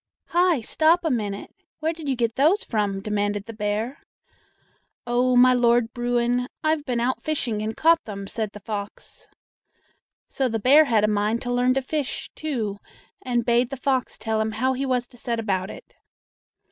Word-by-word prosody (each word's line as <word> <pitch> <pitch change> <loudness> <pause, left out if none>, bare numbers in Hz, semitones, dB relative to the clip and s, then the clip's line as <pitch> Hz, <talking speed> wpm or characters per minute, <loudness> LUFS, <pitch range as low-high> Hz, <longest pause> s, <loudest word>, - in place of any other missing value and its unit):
"Hi! 350 -5 +3
stop 320 +8 +3
a 320 - +2
minute! 205 -5 -3 0.3
Where 320 +1 0
did 315 -3 -6
you 265 - +1
get 235 -2 0
those 330 - +3
from?" 205 - -1
demanded 205 -1 -1
the 230 - -8
bear. 215 +4 -3 1.0
"Oh, 245 +1 +2
my 255 +1 +7
Lord 240 -1 +3
Bruin, 245 0 0 0.2
I've 310 -1 +1
been 245 -3 -1
out 250 +2 0
fishing 245 -9 -2
and 220 +1 -4
caught 330 +1 +4
them," 200 -2 -6
said 220 +1 -3
the 210 - -9
fox. 205 -1 -7 1.0
So 265 -2 -1
the 225 - -1
bear 275 +8 +6
had 225 -6 +2
a - - +4
mind 210 +3 0
to 245 -1 -2
learn 250 +1 +2
to 270 - 0
fish, 290 0 -3
too, 230 -10 -3 0.4
and 240 -2 -1
bade 240 0 +2
the 275 - -5
fox 260 -1 -1
tell 220 0 -1
him 220 0 -2
how 260 +4 +1
he 270 +1 -2
was 250 -1 0
to 245 - -19
set 235 -1 -2
about 190 -3 -1
it. - - -12
240 Hz, 185 wpm, -24 LUFS, 215-265 Hz, 1.0 s, my